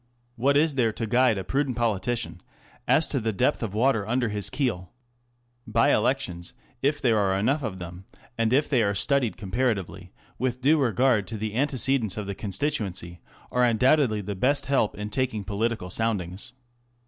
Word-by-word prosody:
What 140 +4 +2
is 155 0 +3
there 120 -4 +2
to 115 +1 -3
guide 120 0 +3
a 95 - -3
prudent 135 +4 -1
politician 110 -6 -1 0.5
as 160 - +4
to 135 - 0
the 110 -1 -1
depth 115 +5 +1
of 105 -3 -4
water 110 -3 +2
under 120 0 0
his 105 -1 -2
keel? 110 -11 -2 0.8
Sye 115 +1 +4
elections, 105 -8 -1 0.3
if 145 +2 +1
there 115 -4 +2
are 95 -1 +1
enough 135 +10 +1
of 110 -7 -4
them 90 +1 -9 0.3
and 115 -1 0
if 140 +4 +3
they 130 -5 +2
are 100 -2 +1
studied 125 +3 +1
comparatively 95 -4 -2 0.3
with 125 -1 -1
due 145 +4 +3
regard 120 -4 +2
to 110 - -5
the 105 0 -4
antecedents 130 -4 0
of 105 - -3
the 100 - -4
constituency, 100 - -3 0.3
are 125 - +2
undoubtedly 120 -1 +3
the 100 +1 -4
best 135 +8 +1
help 135 -6 +1
in 105 0 -5
taking 120 -3 -1
political 105 -1 -2
soundings. 100 -1 -3
115 Hz, 170 wpm, -26 LUFS, 100-130 Hz, 0.8 s, as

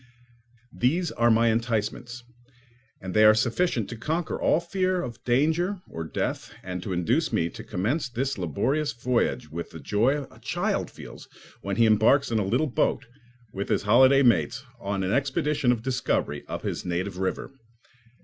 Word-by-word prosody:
These 165 +7 +1
are 120 0 +2
my 115 +1 +4
enticements, 115 +1 -2 0.8
and 95 -1 -6
they 110 - +5
are 110 0 +8
sufficient 120 - 0
to - - -6
conquer 155 +8 -3
all - - +3
fear 185 +1 -1
of 120 -8 -6
danger 160 +10 +1
or 80 - -6
death 80 - -3
and 90 -1 -5
to 95 - -5
induce 110 - 0
me 85 - +1
to - - -10
commence 125 - -2
this 135 +3 -2
laborious 115 - -1
voyage 120 +1 -1
with 85 +1 -5
the 80 - -10
joy 120 - +1
a - - -17
child - - -2
feels - - -12 0.3
when 100 0 -3
he 115 - +4
embarks 110 +6 +4
in 110 - +2
a - - +1
little 120 +11 +1
boat, 135 -1 0 0.5
with 100 +1 -4
his - - +1
holiday 130 +6 +5
mates, 120 +1 +2 0.2
on 100 -3 -2
an 95 - -1
expedition 140 0 +1
of 115 -2 -2
discovery 125 -1 -1
up - - -5
his - - -3
native 90 +1 -3
river. 95 - -2
120 Hz, 170 wpm, -26 LUFS, 100-140 Hz, 0.8 s, are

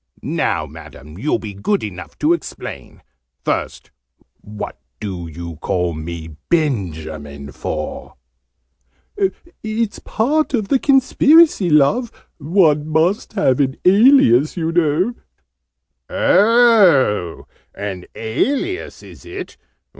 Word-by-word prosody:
"Now, - - -1
Madam, 75 +4 -12
you'll 150 +7 0
be 105 -2 -8
good 195 - -1
enough 95 -3 -8
to 155 +3 +2
explain. 170 - -7 0.4
First, - - -3 0.5
what 105 -8 -8 0.2
do 90 -5 -5
you 85 0 -8
call 90 +1 -1
me 80 0 -7
Benjamin 80 - -2
for?" - - -6 1.5
"It's 220 0 -2
part 285 +5 0
of 215 -4 -2
the 270 - +3
Conspiracy, 280 - +4
Love! 160 - +3 0.3
One 155 -2 +2
must 165 +8 0
have 150 - +1
an 135 -1 0
alias, 185 - +5
you 165 -1 -1
know 170 +6 +1 0.5
" - - -58
"Oh, 190 - +3 0.3
an 95 -3 -5
alias, 275 - -2
is - - -14
it? - - -8
150 Hz, 105 wpm, -19 LUFS, -, 1.5 s, alias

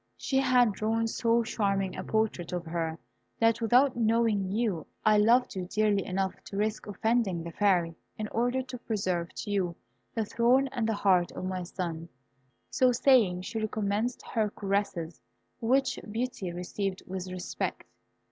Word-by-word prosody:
She 265 - -1
had 250 -4 +4
drawn 220 +3 0
so 230 +1 +2
charming 195 -4 -1
a 185 - -5
portrait 220 -6 -1
of 175 -1 -3
her, 165 -1 -2 0.4
that 230 0 +3
without 250 +4 +4
knowing 225 -4 +2
you, 210 -6 -1 0.2
I 215 -1 +5
loved 235 +4 +4
you 185 -1 -3
dearly 210 0 +1
enough 190 0 -1
to 195 - -6
risk 215 +1 -1
offending 205 -4 0
the 170 - -6
Fairy, 180 -4 +2 0.2
in 215 - -3
order 245 +3 0
to 255 -1 -8
preserve 185 -7 -2
to 205 - -5
you 180 -4 0 0.4
the 225 -2 0
throne 245 +5 +3
and 235 -4 -1
the 220 - +1
heart 185 -4 +3
of - - -5
my 185 0 -2
son." 170 -2 -5 0.6
So 255 -1 +4
saying, 235 -8 +4
she 220 +4 -4
recommenced 215 +2 -1
her 215 -2 0
caresses, 195 - -2 0.4
which 265 +3 +1
Beauty 225 -5 -3
received 185 +2 -4
with 185 0 -5
respect. 185 -1 -4
210 Hz, 155 wpm, -29 LUFS, 185-230 Hz, 0.6 s, I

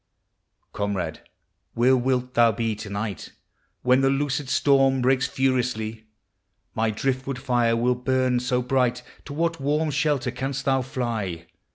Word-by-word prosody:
Comrade, 100 -2 -3 0.5
where 125 +3 +4
wilt 125 0 0
thou 115 -1 +5
be 115 +1 -1
to 105 0 -8
night 100 -1 -5 0.5
When 125 +1 +4
the 135 - +3
loosed 140 0 -1
storm 135 -1 +3
breaks 130 0 +3
furiously? 120 -5 -1 0.7
My 110 0 +1
driftwood 130 +3 -2
tire 120 -3 +2
will 120 +2 +2
burn 130 0 +1
so 125 0 0
bright! 125 -1 +1 0.2
To 145 - -7
what 165 +1 -1
warm 150 +3 0
shelter 140 -3 0
canst 135 +2 -4
thou 135 -1 +2
fly? 110 -10 -3
125 Hz, 140 wpm, -24 LUFS, 115-135 Hz, 0.7 s, thou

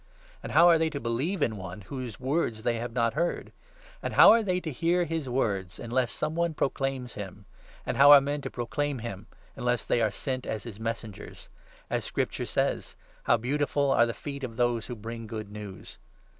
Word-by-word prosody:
And - - -6
how 170 - +7
are 170 -2 +6
they 160 0 +2
to 145 -3 -4
believe 140 +9 -1
in 110 -2 0
one 95 +1 -7
whose 125 +1 -7
words 130 -5 -1
they 120 -1 +1
have 120 +1 -4
not 115 -1 +1
heard? 170 +6 -1 0.5
And - - -4
how - - +10
are 230 - +5
they 185 -4 0
to 160 - -4
hear 170 +6 +1
his 160 -4 -3
words 100 -8 -1
unless 120 0 -1
some 150 - -2
one 170 -1 0
proclaims 135 -3 -2
him? 100 0 -8 0.4
And - - -2
how 140 +1 +8
are 145 - +11
men 145 +1 -2
to - - -5
proclaim 145 +4 -2
him 110 -4 -7 0.3
unless 120 -2 -1
they 120 - +1
are 110 - +3
sent 130 +5 -4
as 110 -3 -3
his 110 -4 -8
15 110 - -9
messengers? 115 -2 -6 0.4
As - - -1
Scripture - - -2
says - - -1
— - - -29
' - - -31
How 120 - +4
beautiful 140 +3 0
are 120 - +5
the 115 - -4
feet 140 -2 -7
of 115 -3 -5
those 120 -2 +1
who 125 - -5
bring 115 +1 -7
good 110 -2 -6
news 105 -2 -9
120 Hz, 210 wpm, -28 LUFS, 115-145 Hz, 0.5 s, are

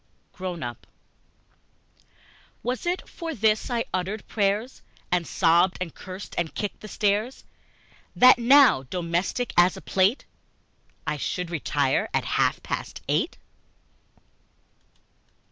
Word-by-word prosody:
Grown 180 -3 -5
up 120 0 -7 1.8
WAS 250 +6 -3
it 360 +1 -2
for 330 -3 -6
this 220 +2 +1
I 235 -2 -1
uttered 190 +4 -3
prayers, 210 +4 -1 0.3
And 175 -2 +1
sobbed 175 +1 +3
and 180 -3 -4
cursed 185 +1 -9
and 170 -2 -3
kicked 205 - -4
the 215 - -10
stairs, 210 +5 -1 0.7
That 255 0 +7
now, 255 - +6
domestic 175 - -2
as 175 +1 +5
a - - -9
plate, 195 +7 +1 0.8
I 150 - -2
should 180 +4 -3
retire 145 -4 0
at - - 0
half - - +1
past - - -5
eight? - - 0
195 Hz, 115 wpm, -25 LUFS, 175-235 Hz, 1.8 s, That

